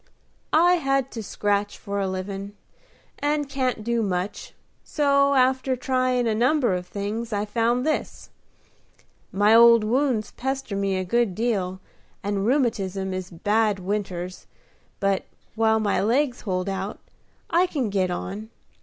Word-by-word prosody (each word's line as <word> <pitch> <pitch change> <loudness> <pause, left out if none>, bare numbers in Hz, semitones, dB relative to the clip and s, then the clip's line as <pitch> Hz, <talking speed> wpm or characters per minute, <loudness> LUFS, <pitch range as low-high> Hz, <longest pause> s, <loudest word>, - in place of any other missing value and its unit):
"I 350 +3 +5
had 275 -4 0
to 225 - -5
scratch 205 0 -1
for 200 0 -4
a 195 - 0
livin', 195 +2 -5 0.6
and 290 0 0
can't 260 -5 -1
do 235 +1 0
much: 190 -1 -3 0.3
so, 280 -1 +2
after 260 0 +2
tryin' 255 -1 0
a 225 - +1
number 245 0 +2
of 180 0 -3
things, 215 +3 -4
I 205 0 -1
found 235 +3 0
this. 310 - -3 1.0
My 205 +2 +4
old 230 -1 +7
wounds 240 -1 0
pester 265 -4 -3
me 195 -1 0
a 185 - -1
good 220 0 +1
deal, 190 -5 -1 0.4
and 200 0 -1
rheumatism 195 -8 0
is 185 -1 -5
bad 205 +4 +1
winters; 185 -2 -4 0.5
but, 195 -1 0 0.3
while 220 0 +2
my 210 -3 +1
legs 250 +5 +1
hold 185 -2 -2
out, 195 +1 -3 0.5
I 350 +2 +4
can 265 - -2
git 190 -2 +1
on. 200 +4 -5
220 Hz, 140 wpm, -24 LUFS, 195-255 Hz, 1.0 s, old